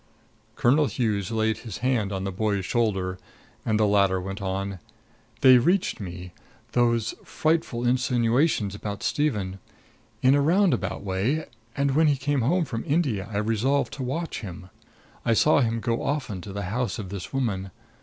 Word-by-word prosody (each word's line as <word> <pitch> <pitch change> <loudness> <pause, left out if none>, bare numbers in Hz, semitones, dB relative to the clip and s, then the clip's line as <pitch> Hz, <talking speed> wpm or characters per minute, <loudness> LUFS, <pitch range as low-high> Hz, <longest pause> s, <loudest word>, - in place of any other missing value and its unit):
Colonel 145 +5 +3
Hughes 105 -8 -1
laid 110 -1 0
his 110 -6 -7
hand 115 -6 +1
on 95 -1 -3
the 95 - -2
boy's 100 0 -1
shoulder, 95 -6 0 0.4
and 110 -1 +1
the 110 - +4
latter 100 -2 +3
went 95 +2 -6
on: 95 0 -3 0.6
"They 130 -1 +8
reached 180 - +1
me 90 -2 -7 0.4
those 120 -2 +2
frightful 155 -7 0
insinuations 120 -2 +2
about 105 -1 -5
Stephen 105 -11 -1 0.6
in 130 +1 +6
a 145 - +4
round 180 +5 +4
about 95 +1 -3
way; 100 +11 0 0.3
and 140 0 +2
when 160 +1 +5
he 145 -2 +3
came 140 0 0
home 165 +8 +2
from 115 -4 -4
India 135 - 0
I 100 - -2
resolved 115 +6 +1
to 140 - -6
watch 160 +7 -3
him. 90 -2 -9 0.5
I 115 - +2
saw 150 +7 +4
him 115 -2 0
go 115 0 -1
often 135 -10 -2
to 100 - -8
the 100 +1 -4
house 120 -3 -1
of 100 -5 -6
this 95 -2 -6
woman. 105 -8 -1
115 Hz, 165 wpm, -25 LUFS, 100-135 Hz, 0.6 s, They